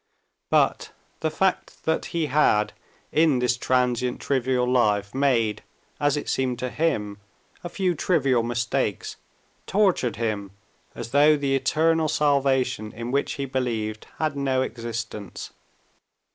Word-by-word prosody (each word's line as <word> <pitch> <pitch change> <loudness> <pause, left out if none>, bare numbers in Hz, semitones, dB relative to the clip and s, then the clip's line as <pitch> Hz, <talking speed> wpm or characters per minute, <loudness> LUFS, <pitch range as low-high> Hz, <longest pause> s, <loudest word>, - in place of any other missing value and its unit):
But - - +1 0.3
the 160 - 0
fact 185 +4 -1
that 160 0 0
he 165 -2 -1
had 135 -8 +2 0.4
in 155 -3 +3
this 125 0 +1
transient, 125 0 0
trivial 130 -2 0
life 105 -5 +2
made, 120 -6 +1 0.4
as 145 0 +2
it - - -4
seemed 130 -2 0
to 125 0 -4
him, 105 -11 -1 0.4
a 175 - -5
few 185 -1 0
trivial 140 -7 +2
mistakes 120 -2 -2 0.5
tortured 190 - +2
him 105 -4 -3 0.4
as 115 - -7
though 150 +2 +5
the 140 -1 0
eternal 160 +3 +2
salvation 135 -7 +1
in 115 +2 -5
which 140 +1 0
he 140 - -3
believed 115 -5 -3
had 155 -2 -1
no 135 -2 +1
existence. 115 -5 -6
130 Hz, 130 wpm, -24 LUFS, 115-150 Hz, 0.5 s, though